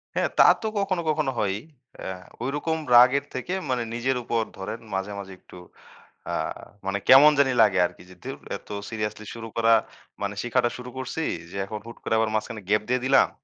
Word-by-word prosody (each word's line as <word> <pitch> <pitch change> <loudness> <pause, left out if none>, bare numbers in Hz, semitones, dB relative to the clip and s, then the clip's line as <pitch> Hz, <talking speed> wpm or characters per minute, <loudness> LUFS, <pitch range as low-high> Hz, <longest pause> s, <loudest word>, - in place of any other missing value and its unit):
হ্যাঁ। - - +1
তা - - +10 0.2
তো 220 - -2
কখনো, 190 -3 0
কখনো 150 -3 +1
হয়ই। 100 0 0 0.4
অ্যা 95 - -5 0.3
ওইরকম 145 +5 -1 0.2
রাগের 130 +3 +7
থেকে 130 +8 -4 0.2
মানে 125 -2 0
নিজের 125 +2 0
উপর 115 0 0 0.2
ধরেন 95 +4 -5
মাঝে, 95 +1 -2
মাঝে 95 -1 -8
একটু - - -15 0.7
আ - - -3 0.5
মানে 100 +1 0
কেমন 140 +4 +9
জানি 135 -2 +4
লাগে 100 -4 +4
আরকি। 90 0 -7
যে 90 - -13
ধুর - - -6 0.2
এত - - -23 0.2
সিরিয়াসলি 105 -1 -4
শুরু 115 -1 -7
করা 115 0 +5 0.5
মানে 100 0 -2
শিখাটা 120 0 +1
শুরু 125 0 -8
করছি, 130 +5 -3 0.3
যে 100 - -6
এখন 105 +2 -6
হুট 115 - -10
করে - - -1
আবার 110 0 +2
মাঝখানে 110 0 -3
গ্যাপ 105 0 +3
দিয়ে 125 0 +1
দিলাম? 135 0 +5
115 Hz, 190 wpm, -25 LUFS, 105-130 Hz, 0.7 s, তা